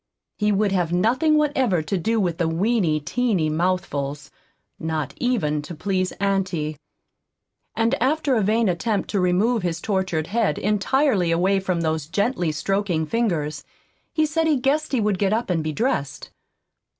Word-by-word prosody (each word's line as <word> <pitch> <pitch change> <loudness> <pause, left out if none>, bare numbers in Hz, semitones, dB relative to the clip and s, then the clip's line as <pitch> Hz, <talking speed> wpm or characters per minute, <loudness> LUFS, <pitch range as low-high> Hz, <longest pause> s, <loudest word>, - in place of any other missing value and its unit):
He 210 0 +2
would 205 0 +1
have 175 -3 0
nothing 255 - +3
whatever 260 - +1
to 155 - -2
do 220 +5 0
with 175 -5 -1
the 170 - +1
"weeny, 170 -2 +1
teeny 175 0 0
mouthfuls," 150 -5 -2 0.5
not 160 -3 -3
even 170 -13 0
to 165 +3 -8
please 185 +3 -1
auntie. 185 -6 -1 1.0
And 225 0 +1
after 290 +2 +1
a 225 - +2
vain 220 +3 +2
attempt 190 +4 -1
to 200 - +1
remove 195 +6 +2
his 175 -2 -2
tortured 185 -5 -1
head, 225 +4 0
entirely 210 - +1
away 185 +4 +2
from 185 -3 -1
those 160 -2 -1
gently 200 -2 0
stroking 180 +1 -1
fingers, 155 -9 -1 0.5
he 315 -2 +2
said 320 +1 0
he 310 - +3
guessed 285 +4 0
he 260 - +1
would 205 -3 0
get 200 0 +2
up 225 -3 -1
and 165 -3 0
be 155 - -2
dressed. 145 - -2
190 Hz, 160 wpm, -23 LUFS, 165-230 Hz, 1.0 s, nothing